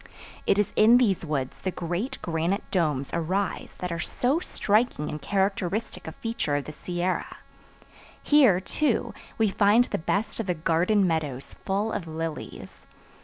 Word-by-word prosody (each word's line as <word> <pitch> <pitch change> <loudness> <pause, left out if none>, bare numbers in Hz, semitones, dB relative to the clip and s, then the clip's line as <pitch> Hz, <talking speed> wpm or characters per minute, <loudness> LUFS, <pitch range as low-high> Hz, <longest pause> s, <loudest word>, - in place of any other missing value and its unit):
It - - +4
is 205 -2 +1
in 225 +3 +7
these 210 -9 +2
woods 140 -5 -3
the 190 - -2
great 180 +10 -3
granite 170 +4 -1
domes 150 -7 0
arise 185 +4 -2
that 180 -1 -4
are 170 - -3
so 265 - 0
striking 215 - 0
and 150 - -6
characteristic 195 +1 -1
a - - -4
feature 225 -10 -2
of 145 - -1
the - - -6
Sierra. 175 +3 -3 0.9
Here, 260 -12 +5
too, 240 +2 0 0.2
we 220 -3 +2
find 205 +5 +5
the - - -3
best 205 +7 -1
of 225 - -2
the 180 - 0
garden 175 +6 +2
meadows 150 -6 -2
full 205 +3 -2
of 200 -6 -4
lilies. 160 0 -6
185 Hz, 155 wpm, -26 LUFS, 165-215 Hz, 0.9 s, in